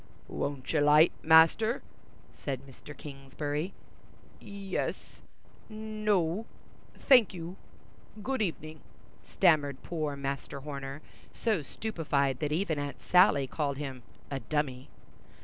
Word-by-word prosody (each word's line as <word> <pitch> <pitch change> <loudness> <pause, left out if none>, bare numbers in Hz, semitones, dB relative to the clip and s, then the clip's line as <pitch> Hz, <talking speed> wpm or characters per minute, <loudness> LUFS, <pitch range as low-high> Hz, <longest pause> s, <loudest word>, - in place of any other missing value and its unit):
"Won't 140 -1 -3
you 155 - +3
'light, 150 +3 +6
Master?" 165 +9 +5 0.5
said 135 -2 -5
Mr. 140 +2 -12
Kingsbury. 145 +4 -4 0.7
"Yes—no—thank 215 - -1
you—good 205 +7 -7
evening," 155 -5 -3 0.4
stammered 150 -7 +2
poor 155 -4 -3
Master 140 0 -4
Horner, 140 0 -6 0.3
so 215 -7 0
stupefied 145 - -1
that 150 -1 -1
even 160 -2 0
Aunt 145 0 -4
Sally 180 -6 +5
called 140 0 -2
him 135 -3 -5 0.3
"a 135 - -2
dummy." 135 -3 -2
155 Hz, 95 wpm, -30 LUFS, 140-190 Hz, 0.7 s, light